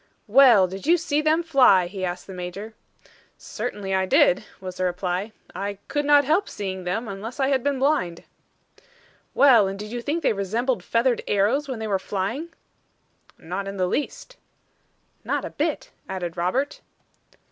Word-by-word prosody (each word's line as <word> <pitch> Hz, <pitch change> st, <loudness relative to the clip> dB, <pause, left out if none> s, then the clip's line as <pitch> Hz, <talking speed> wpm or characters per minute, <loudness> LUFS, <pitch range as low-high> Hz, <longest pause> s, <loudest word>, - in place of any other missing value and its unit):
"Well, 235 Hz, -4 st, +6 dB
did 190 Hz, +6 st, -7 dB
you 345 Hz, +2 st, +5 dB
see 305 Hz, -3 st, 0 dB
them 315 Hz, +2 st, +2 dB
fly?" 260 Hz, -, +5 dB
he 190 Hz, +2 st, -6 dB
asked 180 Hz, 0 st, -3 dB
the 190 Hz, -, -9 dB
Major. 185 Hz, +5 st, -7 dB, 0.6 s
"Certainly 210 Hz, -4 st, -5 dB
I 190 Hz, 0 st, +1 dB
did," 185 Hz, +1 st, +4 dB, 0.2 s
was 185 Hz, -1 st, -7 dB
the 185 Hz, -, -1 dB
reply. 180 Hz, +3 st, -2 dB, 0.2 s
"I 200 Hz, 0 st, -4 dB
could 290 Hz, 0 st, -1 dB
not 290 Hz, -1 st, +5 dB
help 335 Hz, +8 st, +1 dB
seeing 190 Hz, -2 st, -5 dB
them, 220 Hz, +7 st, -2 dB
unless 210 Hz, +6 st, -7 dB
I 270 Hz, 0 st, +2 dB
had 265 Hz, -3 st, +1 dB
been 285 Hz, -1 st, 0 dB
blind." 260 Hz, -, 0 dB, 1.1 s
"Well 240 Hz, -8 st, +6 dB
and 195 Hz, +1 st, -4 dB
did 210 Hz, +1 st, -8 dB
you 240 Hz, 0 st, -4 dB
think 305 Hz, +7 st, -2 dB
they -, -, +3 dB
resembled 225 Hz, +6 st, -1 dB
feathered 235 Hz, +1 st, +1 dB
arrows 220 Hz, +9 st, +1 dB
when 260 Hz, -3 st, -4 dB
they 220 Hz, 0 st, -4 dB
were 195 Hz, -2 st, 0 dB
flying?" 210 Hz, -, -3 dB, 0.9 s
"Not 190 Hz, +4 st, -5 dB
in 200 Hz, 0 st, -6 dB
the 185 Hz, -, +1 dB
least." 300 Hz, -, -4 dB, 0.9 s
"Not -, -, -2 dB
a -, -, -6 dB
bit," -, -, -2 dB, 0.2 s
added 180 Hz, -3 st, -4 dB
Robert. 215 Hz, +12 st, -1 dB
210 Hz, 170 wpm, -24 LUFS, 190-275 Hz, 1.1 s, Well